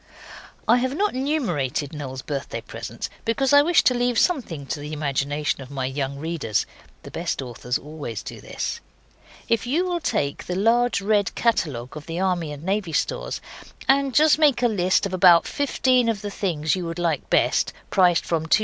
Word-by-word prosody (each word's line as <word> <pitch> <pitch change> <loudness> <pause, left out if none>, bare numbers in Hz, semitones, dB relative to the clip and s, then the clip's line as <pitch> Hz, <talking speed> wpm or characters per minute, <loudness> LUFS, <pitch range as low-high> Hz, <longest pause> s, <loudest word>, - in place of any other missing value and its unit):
I 240 - +6
have 260 +3 -1
not 415 +2 +1
numerated 190 - -1
Noel's 130 -3 -6
birthday 140 -5 -4
presents 115 +1 -6 0.2
because 265 +4 +1
I 285 - +9
wish 335 +3 +4
to 255 - +4
leave 245 -1 0
something 220 - 0
to 135 +3 -4
the 150 +1 -6
imagination 145 0 -1
of 130 - -10
my 135 -2 -3
young 135 +1 -3
readers. 150 -8 -1 0.4
(The - - -10
best - - -3
authors 125 -1 -3
always 145 -7 -7
do - - -8
this.) - - -4 0.7
If 230 0 +1
you 325 +9 +1
will 355 -1 -1
take 140 - -2
the 180 - -2
large, 230 +3 +2
red 205 -1 +1
catalogue 145 - 0
of 150 -1 -9
the 165 +1 -4
Army 180 -5 0
and 145 +1 -8
Navy 190 -2 -1
Stores, - - -2 0.5
and 275 -1 +3
just 310 0 +5
make 285 -5 +4
a - - +6
list 190 -3 +2
of 195 - -4
about 180 -2 +6
fifteen 255 -4 +2
of 210 -3 -2
the 205 - -4
things 160 -6 0
you 180 -2 -4
would 165 +1 -5
like 165 -5 -1
best - - +2 0.2
prices 180 -3 +4
from 160 -1 -1
2s. 215 - +5
175 Hz, 185 wpm, -23 LUFS, 145-245 Hz, 0.7 s, I